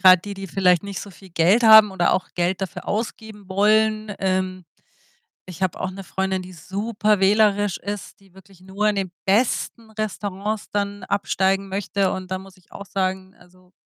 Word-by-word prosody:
grad 185 -1 +7
die, 200 -1 -6
die 195 0 -7
vielleicht 180 0 +3
nicht 200 -2 -6
so 200 - -9
viel 190 +1 -16
Geld 175 +8 +3
haben 220 -2 +9
oder 190 -2 +1
auch 185 - -1
Geld 180 +2 0
dafür 190 -3 -5
ausgeben 215 -2 -4
wollen, 215 +1 +2
ähm 185 -1 -1 0.8
ich 180 0 -9
habe 185 - 0
auch 185 - -2
'ne 195 +1 -8
Freundin, 190 0 -2
die 185 0 -11
super 205 +4 -1
wählerisch 205 -1 +3
ist, 205 +1 -6
die 190 -2 -23
wirklich 190 -1 -18
nur 200 +3 -1
in 210 - 0
den 190 -2 -2
besten 225 +1 0
Restaurants 210 0 -4
dann 205 -1 -2
absteigen 195 0 0
möchte. 195 0 -1
Und 185 0 -6
da 185 - -1
muss 190 0 -14
ich 185 - -27
auch 200 - -8
sagen, 190 0 -2
also, 180 +1 -22
195 Hz, 180 wpm, -22 LUFS, 185-205 Hz, 0.8 s, haben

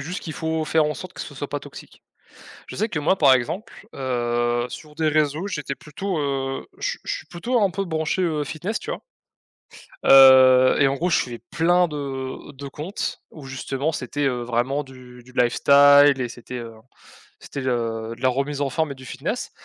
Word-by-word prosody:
juste 175 +6 -5
qu'il 160 - -6
faut 160 0 -2
faire 160 0 +2
en 150 0 -1
sorte 185 -1 -9
que - - -9
ça - - -7
soit - - -5
pas - - -4
toxique. - - -13 0.6
Je - - -9
sais 220 - 0
que 160 - -3
moi 155 +6 +2
par 145 -7 +6
exemple, 165 - -1 0.2
heu, 120 -2 -1
sur 150 +3 -10
des 160 -1 0
réseaux, 155 +3 +1
j'étais 150 -8 -4
plutôt, 170 +6 -5
heu, 135 -2 -2
je - - -1
suis - - -6
je - - -2
suis - - -13
plutôt 225 +7 -1
un 195 - +3
peu 195 +2 -3
branché, 160 +1 -1
heu, 155 -4 0
fitness, 175 +9 -4
tu - - -7
vois? - - -4 1.1
Heu, 130 -1 +8
et 140 - +6
en 135 - 0
gros, 175 +6 -1
je 160 - +3
suivais 120 -2 -3
plein 175 +2 +3
de 135 -2 -6
de 140 0 -9
comptes 150 +8 -5
où 150 -4 -12
justement, 135 +3 -3
c'était, 145 -1 -3
heu, 125 -3 0
vraiment 125 +4 -1
du 125 -2 -14
du 125 - -17
lifestyle 140 +3 +6
et 125 - -1
c'était, 120 +1 -9
heu, 115 -1 -7 0.7
c'était, 140 - -7
heu, 115 -3 -2
de - - -18
la 130 - +3
remise 140 +3 -2
en 140 - 0
forme 160 +1 -1
et - - -6
du 130 0 -13
fitness. - - -4
140 Hz, 205 wpm, -23 LUFS, 130-160 Hz, 1.1 s, Heu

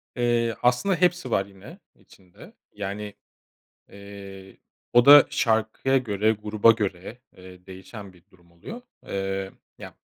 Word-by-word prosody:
Eee, 120 -1 0
aslında 125 +11 +1
hepsi 180 +1 0
var 95 - +1
yine 95 -1 -15 0.2
içinde. 90 -2 -19 0.2
Yani, 105 0 -6 0.8
eee, 100 -1 -12 0.4
o 120 +1 +4
da 145 -1 +9
şarkıya 110 +4 0
göre, 110 -2 0
gruba 105 +1 +3
göre, 105 +1 -5 0.2
eee, 90 0 -15
değişen 95 +1 -11
bir 90 -2 -22
durum 85 -2 -25
oluyor. 210 - -10 0.3
Eee, 95 0 -4 0.3
ya, - - -11
105 Hz, 125 wpm, -24 LUFS, 95-120 Hz, 0.8 s, da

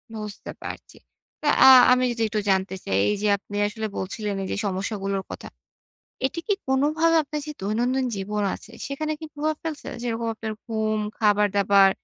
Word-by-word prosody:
বুঝতে 210 -1 -7
পারছি। - - -8 0.5
তো - - -2 0.2
আ - - +12 0.2
আমি 255 0 +4
যদি 230 - -4
একটু 215 0 -1
জানতে 190 0 +1
চাই, 95 - 0
এইযে 210 0 0
আপনি 205 +1 -11
আসলে 220 +1 -4
বলছিলেন, 205 +2 -3
এইযে 190 - -3
সমস্যাগুলোর 195 0 -2
কথা। - - -7 0.8
এটি 335 +5 -4
কি 410 - +4
কোনভাবে 305 +5 +2
আপনার 300 +1 -5
যে 300 - -4
দৈনন্দিন 245 +6 0
জীবন 205 +2 -2
আছে, 220 - -12 0.2
সেখানে 305 +3 -3
কি 320 - -7
প্রভাব 305 +1 -1
ফেলছে? 315 -3 -5 0.2
যেরকম 230 -1 -2
আপনার 220 0 -5
ঘুম, 220 -1 -1 0.2
খাবার-দাবার 200 -2 +4
215 Hz, 160 wpm, -24 LUFS, 200-265 Hz, 0.8 s, আ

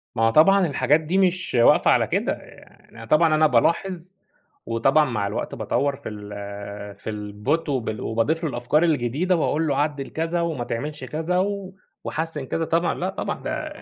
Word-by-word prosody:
ما 115 - +1
هو 115 - +5
طبعًا 185 +9 +5
الحاجات 150 +1 +2
دي 160 +4 -1
مش 185 -3 +1
واقفة 120 - +5
على - - +3
كده، - - 0
يع - - -9 0.5
يعني 115 -1 -11
طبعًا 155 +4 +4
أنا 155 0 +5
بالاحظ 175 +7 0 0.5
وطبعًا 135 +7 +3
مع 115 -7 -2
الوقت 100 - -4
باطوّر 135 +6 0
في 140 - -8
ال 100 -1 -8
في 100 - -8
الbot، 105 +10 -2
وب 115 -6 -2
وباضيف 130 +10 -1
له 160 - 0
الأفكار 130 +5 +1
الجديدة 155 +3 +1
وأقول 160 -1 0
له 140 -2 0
عدّل 145 -1 -1
كذا 165 +2 -1
وما 160 -7 -2
تعملش 145 +5 -5
كذا 160 +7 -2
و 195 0 -2 0.3
وحسّن 160 -3 -4
كذا 165 +5 -2
طبعًا، 165 +1 +1
لا 185 - -2
طبعًا 190 - -4
ده - - -5
150 Hz, 180 wpm, -23 LUFS, 115-165 Hz, 0.5 s, هو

